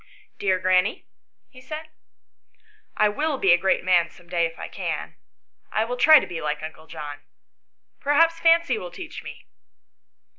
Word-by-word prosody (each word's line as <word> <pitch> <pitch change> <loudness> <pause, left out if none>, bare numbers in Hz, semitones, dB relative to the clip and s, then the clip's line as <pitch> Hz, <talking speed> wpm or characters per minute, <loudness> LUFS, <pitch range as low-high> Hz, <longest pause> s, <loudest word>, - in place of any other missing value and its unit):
" - - -34
Dear 190 -2 +1
granny," 185 +2 +1 0.5
he 255 - -14
said, 310 +4 -8 0.6
" 430 -1 -35
I 215 - +4
will 290 +7 -1
be 190 -7 +4
a - - +5
great 190 0 +1
man 175 -2 +3
some 175 0 -19
day 170 -1 +1
if 165 - -14
I - - -6
can. - - -5 0.6
I 220 - +1
will 245 +2 -3
try 310 +5 +8
to - - -5
be 175 -3 -6
like 150 0 -3
uncle 160 0 -9
John. 150 -3 -8 0.8
Perhaps 330 +3 +3
Fancy 330 -8 +3
will 180 - -7
teach - - -9
me." - - -11
195 Hz, 175 wpm, -24 LUFS, -, 0.8 s, try